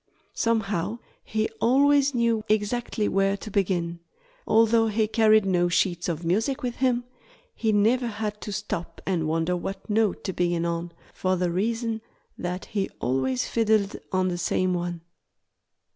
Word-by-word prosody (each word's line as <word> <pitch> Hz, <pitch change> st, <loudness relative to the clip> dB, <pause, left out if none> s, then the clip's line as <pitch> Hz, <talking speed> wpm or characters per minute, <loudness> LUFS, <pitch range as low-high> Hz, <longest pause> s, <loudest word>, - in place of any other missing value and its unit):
Somehow 215 Hz, -3 st, 0 dB, 0.3 s
he 220 Hz, 0 st, -1 dB
always 280 Hz, +2 st, +4 dB
knew 230 Hz, -2 st, +2 dB
exactly 215 Hz, +1 st, 0 dB
where 195 Hz, +1 st, +1 dB
to 215 Hz, -, -9 dB
begin. 175 Hz, -4 st, 0 dB, 0.5 s
Although 225 Hz, 0 st, +4 dB
he 220 Hz, 0 st, +1 dB
carried 215 Hz, -1 st, +4 dB
no 175 Hz, -2 st, +2 dB
sheets 175 Hz, 0 st, +1 dB
of 165 Hz, 0 st, -3 dB
music 225 Hz, -, 0 dB
with 245 Hz, -1 st, -3 dB
him, 250 Hz, -2 st, +1 dB, 0.5 s
he 220 Hz, -2 st, 0 dB
never 225 Hz, +4 st, +3 dB
had 210 Hz, -1 st, -4 dB
to 210 Hz, -, -5 dB
stop 195 Hz, -4 st, -4 dB
and 170 Hz, -5 st, 0 dB
wonder 165 Hz, +3 st, 0 dB
what 195 Hz, +2 st, -5 dB
note 215 Hz, -2 st, +1 dB
to 190 Hz, -, -3 dB
begin 175 Hz, -1 st, 0 dB
on, 170 Hz, 0 st, -2 dB, 0.2 s
for 185 Hz, 0 st, 0 dB
the 180 Hz, -1 st, 0 dB
reason 225 Hz, +4 st, -1 dB, 0.3 s
that 180 Hz, +1 st, -4 dB
he 200 Hz, -2 st, -2 dB
always 130 Hz, 0 st, 0 dB
fiddled 220 Hz, -3 st, +2 dB, 0.2 s
on 185 Hz, 0 st, +1 dB
the 175 Hz, -1 st, -3 dB
same 185 Hz, +1 st, +1 dB
one. 175 Hz, -1 st, -3 dB
205 Hz, 150 wpm, -26 LUFS, 175-225 Hz, 0.5 s, always